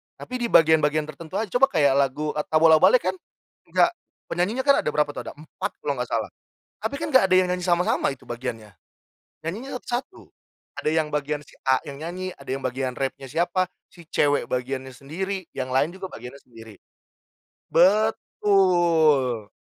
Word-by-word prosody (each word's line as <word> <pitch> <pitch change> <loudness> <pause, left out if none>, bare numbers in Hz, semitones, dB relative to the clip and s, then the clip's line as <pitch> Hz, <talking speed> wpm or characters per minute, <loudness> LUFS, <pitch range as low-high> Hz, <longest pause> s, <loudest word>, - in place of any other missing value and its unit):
tapi 255 0 -6
di 240 - 0
bagian-bagian 155 -4 +4
tertentu 155 +4 -10
saja. 215 -3 -2
Coba 270 +2 +5
kayak 150 - +3
lagu, 145 +3 0
eee, 150 - -3
Tabola 160 0 +6
Bale - - +6
kan - - 0 0.5
nggak 345 - +3 0.4
penyanyinya 200 +10 0
ada 280 - +3
berapa 150 0 +1
tuh? - - -8
Ada - - -6
4 155 +1 -6
kalau 145 - 0
nggak 125 - -2
salah. 110 -2 -2 0.5
Tapi 220 +6 -3
kan - - -2
nggak 260 -7 +6
ada 185 - +2
yang 185 -1 +4
nyanyi 180 0 -2
sama-sama 175 -5 +1
itu 130 - -27
bagiannya. 115 -3 -5 0.7
Nyanyinya 225 +12 -5
sat 245 +1 -1
satu. 380 - -18 0.5
Ada 155 - 0
yang 155 -1 0
bagian 150 0 -2
si - - -19
A 130 -1 +4
yang 140 -1 -9
nyanyi, 180 +3 -5
ada 140 - -14
yang 135 - -7
bagian 130 0 -2
rapnya 135 0 -4
siapa, 175 +5 0 0.2
si 170 -3 -16
cewek 145 -2 +1
bagiannya 130 +1 -3
sendiri, 185 +8 -4
yang 130 -1 -4
lain 145 +5 +2
juga 190 0 -7
bagiannya 125 +4 -10
sendiri. 115 -5 -15 0.9
Betul. 175 - +3
155 Hz, 170 wpm, -24 LUFS, 135-185 Hz, 0.9 s, Tabola